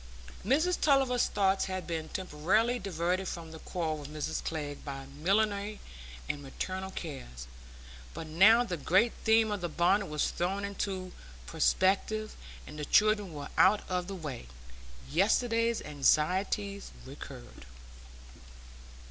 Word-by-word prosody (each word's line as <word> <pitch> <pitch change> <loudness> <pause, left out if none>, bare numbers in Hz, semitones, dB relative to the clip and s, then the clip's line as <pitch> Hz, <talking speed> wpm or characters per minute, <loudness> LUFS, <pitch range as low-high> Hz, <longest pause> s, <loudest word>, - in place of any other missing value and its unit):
Mrs 310 - +2
Tulliver's 270 -4 +3
thoughts 195 -1 +1
had 185 -1 -4
been 160 -2 -4
temporarily 190 +8 0
diverted 185 -1 -1
from 165 -2 -6
the 160 - -9
quarrel 160 -3 -3
with 145 -1 -8
Mrs 155 +1 -3
Glegg 145 -3 -4
by 135 -1 -6
millinery 200 +8 0 0.5
and 145 - -3
maternal 185 +7 -5
cares, 135 - -7 0.7
but - - -5
now 200 +10 +6
the 180 -7 -3
great 190 - +3
theme 220 -1 +4
of 205 -2 -2
the 175 - -2
bonnet 185 +5 +2
was 150 -1 -1
thrown 195 +3 -1
into 195 -2 -4 0.3
perspective, 200 - +1 0.3
and 150 +1 -9
the 150 - -3
children 210 +1 +3
were 145 -2 -7
out 200 +2 +5
of 180 -1 -2
the 195 - -5
way, 145 - -6 0.6
yesterday's 230 - +2
anxieties 185 +7 +1 0.2
recurred. - - -11
185 Hz, 130 wpm, -30 LUFS, 155-210 Hz, 0.7 s, now